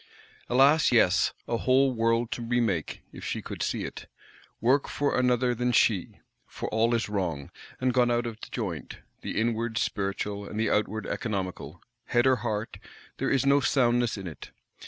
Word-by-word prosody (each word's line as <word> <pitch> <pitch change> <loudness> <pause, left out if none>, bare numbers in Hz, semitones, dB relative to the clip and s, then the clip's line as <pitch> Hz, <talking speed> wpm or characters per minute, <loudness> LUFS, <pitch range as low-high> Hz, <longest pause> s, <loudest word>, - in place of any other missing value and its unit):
Alas, 140 +5 +5
yes! 110 -7 +4 0.2
a 115 - 0
whole 130 +2 +3
world 115 0 +1
to - - -3
remake, 115 -8 -1
if - - -11
she - - -3
could - - -7
see - - -1
it; - - -7 0.5
work 130 +5 +2
for 145 0 0
another 125 0 +2
than 125 +1 0
she! 110 -5 +2 0.3
For - - -6
all 115 +2 +2
is 115 - -1
wrong, 90 -9 -3 0.3
and 130 -1 +1
gone 125 -1 +3
out 120 0 +1
of 115 -2 -6
joint; 90 - -5 0.2
the - - -3
inward 115 0 -1
spiritual, 100 0 -2
and 110 - -5
the 110 -1 +1
outward 105 +1 0
economical; 95 -5 -4 0.2
head 120 +1 +2
or 130 -1 +4
heart, 110 -2 -3 0.4
there - - -1
is 135 -1 +2
no 140 +1 +5
soundness 120 -4 +2
in 95 - -7
it. 80 -4 -8
115 Hz, 170 wpm, -27 LUFS, 105-125 Hz, 0.5 s, Alas